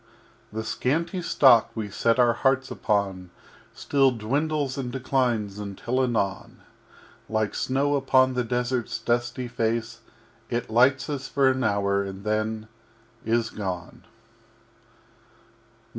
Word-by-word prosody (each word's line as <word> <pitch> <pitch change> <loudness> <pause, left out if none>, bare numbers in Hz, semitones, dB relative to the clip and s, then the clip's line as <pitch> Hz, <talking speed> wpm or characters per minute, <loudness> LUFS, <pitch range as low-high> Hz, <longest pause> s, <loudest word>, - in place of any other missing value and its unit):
_] - - -33 0.5
VIII 110 +1 -3
The - - -6
Scanty 165 - -1
Stock 130 -8 +5
we 105 -3 -4
set 115 +4 +1
our 120 -2 +4
hearts 135 +2 +1
upon 95 -3 -1 0.4
Still 135 -2 +2
dwindles 140 +4 -1
and 130 -3 -4
declines 125 -6 -1
until 105 +5 -2
anon, 105 -6 -2 0.7
Like 110 -1 0
Snow 140 +2 0
upon 130 -2 +3
the 125 -1 0
Desert's 120 0 -1
dusty 120 +1 -1
Face, 115 -1 -2 0.5
It 120 -1 -3
lights 130 +4 +4
us 140 -3 -4
for 135 -1 +3
an 130 0 -2
hour 100 -1 +1
and 95 0 -7
then 110 +1 -2 0.6
is 115 0 +1
gone. 90 -5 -6
120 Hz, 125 wpm, -25 LUFS, 110-130 Hz, 0.7 s, Stock